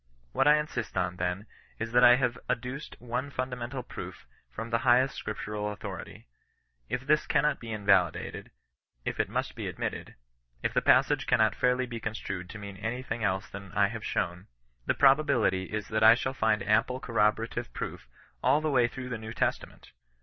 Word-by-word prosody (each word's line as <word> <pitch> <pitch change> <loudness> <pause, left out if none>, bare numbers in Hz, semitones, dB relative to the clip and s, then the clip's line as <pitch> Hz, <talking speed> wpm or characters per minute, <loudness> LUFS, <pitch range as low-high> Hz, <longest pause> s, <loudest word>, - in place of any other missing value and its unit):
What 135 - +2
I 150 - +8
insist 150 -9 -4
on, 90 -1 0
then, 90 +3 -2 0.3
is, 115 0 -4
that 125 +1 +5
I 120 0 +9
have 125 -2 0
adduced 125 +5 -3
one 125 +3 -3
fun 130 -1 -3
damental 125 +1 -5
proof - - -8 0.2
from 115 - -7
the 115 - +2
highest 130 +1 +4
scripture 105 - -5
authority. 105 -2 -5 0.6
If 130 - -3
this 150 +1 +2
cannot 150 +1 +2
be 115 -1 -7
invalidated; 100 -5 +1 0.6
if - - -3
it - - +1
must - - -2
be - - -5
admitted; - - -5 0.5
if - - 0
the - - +2
passage - - +4
cannot - - +4
fairly 125 0 +1
be 120 -2 -6
construed 100 -5 -5
to 110 - -8
mean 100 -1 -8
any 115 +5 -3
thing 115 -2 -4
else 95 -1 0
than 100 0 -9
I - - +3
have - - -6
shown, 90 +2 -2 0.4
the - - +2
probability 135 -9 +4
is 105 +2 -5
that 110 0 0
I 110 +1 +9
shall 130 +2 -2
find 110 -4 +1
ample 115 +4 +2
corroborative 115 0 0
proof - - -6 0.3
all 150 - +4
the 155 -1 -1
way 125 -3 +4
through 125 +1 -7
the 120 -2 -4
New 110 0 -7
Testament. - - -2
115 Hz, 185 wpm, -29 LUFS, 105-125 Hz, 0.6 s, I